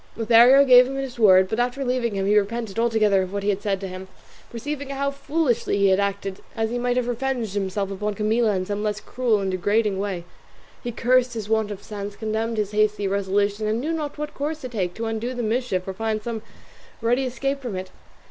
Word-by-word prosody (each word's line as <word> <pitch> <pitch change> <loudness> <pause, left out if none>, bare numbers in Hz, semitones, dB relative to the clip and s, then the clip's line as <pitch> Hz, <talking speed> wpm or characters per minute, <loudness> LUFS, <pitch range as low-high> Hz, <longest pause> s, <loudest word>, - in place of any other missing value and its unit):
Lothario 235 +5 +6
gave 250 -1 +8
him 270 - -5
his 270 -3 -5
word, 190 -3 +6
but 220 +4 -2
after 250 +3 -1
leaving 245 -4 0
him 195 0 -1
he 205 +1 +3
repented 215 0 0
altogether 220 -4 +3
of 185 0 -4
what 200 0 -3
he 205 - +1
had 200 -1 0
said 200 -2 -1
to 195 - -4
him, 185 0 -8 0.4
perceiving 280 +4 -5
how 280 0 -1
foolishly 280 -5 0
he 200 -1 +4
had 190 +1 +3
acted, 200 -1 -2
as 225 -1 -1
he 245 - -1
might 245 0 0
have 250 -1 0
revenged 245 -3 -2
himself 195 0 -2
upon 205 +1 -3
Camilla 215 +1 +1
in 185 0 -1
some 205 +1 -3
less 210 -1 -1
cruel 235 -1 0
and 190 -1 -1
degrading 205 +2 +1
way. 195 -4 -3 0.6
He 240 - -3
cursed 250 +1 +2
his 215 -2 -5
want 220 -1 +1
of 205 -1 -7
sense, 205 -1 -6
condemned 220 +1 -2
his 210 -1 -1
hasty 210 -1 +1
resolution, 200 +2 0
and 220 +2 0
knew 310 +6 -2
not 300 -3 -4
what 300 0 -5
course 300 +2 -3
to 255 - -5
take 185 -7 -2
to 225 - -4
undo 225 +3 -3
the 245 - -3
mischief 220 -5 -1
or 190 - -3
find 215 +1 -2
some 230 -1 -4 0.6
ready 240 +3 +1
escape 275 +2 -2
from 240 -7 -4
it. 185 0 -6
220 Hz, 225 wpm, -23 LUFS, 200-245 Hz, 0.6 s, gave